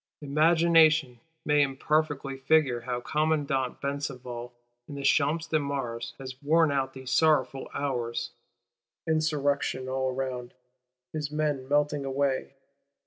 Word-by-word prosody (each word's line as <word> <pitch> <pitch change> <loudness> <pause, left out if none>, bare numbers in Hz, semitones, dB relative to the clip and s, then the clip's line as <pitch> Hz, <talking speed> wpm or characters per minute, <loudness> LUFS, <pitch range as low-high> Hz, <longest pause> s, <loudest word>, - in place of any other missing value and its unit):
Imagination 155 -3 +4 0.3
may, 150 -1 +4
imperfectly, 140 0 0
figure 135 -3 +2
how 125 0 -3
Commandant 145 -3 0
Besenval, 125 -4 -4 0.4
in 145 - -8
the 140 - -5
Champ 155 +3 +3
de 155 -1 0
Mars, 135 -5 -4
has 130 -1 -9
worn 160 +1 +3
out 135 -1 -1
these 130 -1 -7
sorrowful 135 -4 +2
hours 120 -4 -2 0.8
Insurrection 145 -4 0
all 130 0 -1
round; 125 -2 -4 0.6
his 150 -2 -3
men 150 -3 -2
melting 145 0 +1
away! 135 0 -1
140 Hz, 115 wpm, -28 LUFS, 130-150 Hz, 0.8 s, Imagination